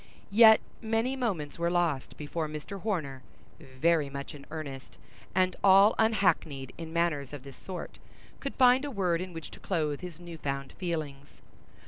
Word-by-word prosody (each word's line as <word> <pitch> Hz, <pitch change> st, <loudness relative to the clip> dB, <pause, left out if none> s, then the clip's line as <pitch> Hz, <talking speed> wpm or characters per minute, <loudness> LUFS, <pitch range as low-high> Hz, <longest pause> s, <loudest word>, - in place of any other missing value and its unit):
Yet 220 Hz, +1 st, +8 dB, 0.2 s
many 225 Hz, +3 st, 0 dB
moments 185 Hz, -, -2 dB
were 170 Hz, 0 st, +1 dB
lost 170 Hz, -6 st, 0 dB
before 155 Hz, +2 st, -3 dB
Mr. 155 Hz, +6 st, -7 dB
Horner, 155 Hz, -11 st, -2 dB, 0.4 s
very 145 Hz, +3 st, +1 dB
much 140 Hz, +2 st, -6 dB
in 140 Hz, -2 st, -12 dB
earnest, 140 Hz, -5 st, -7 dB, 0.4 s
and 185 Hz, -1 st, +2 dB
all 195 Hz, +2 st, +7 dB
unhackneyed 180 Hz, -, +1 dB
in 165 Hz, -1 st, -7 dB
matters 160 Hz, -5 st, 0 dB
of 140 Hz, -3 st, -7 dB
this 140 Hz, -2 st, -11 dB
sort, 185 Hz, -2 st, -7 dB, 0.4 s
could 275 Hz, -, -5 dB
find 255 Hz, +1 st, +5 dB
a 290 Hz, -, -3 dB
word 180 Hz, -8 st, 0 dB
in 185 Hz, 0 st, -5 dB
which 165 Hz, -2 st, -8 dB
to -, -, -11 dB
clothe 155 Hz, -6 st, -1 dB
his 175 Hz, -3 st, -8 dB
new 170 Hz, -2 st, -9 dB
found 140 Hz, -2 st, -3 dB
feelings. 155 Hz, -6 st, -4 dB
170 Hz, 160 wpm, -29 LUFS, 145-195 Hz, 0.4 s, Yet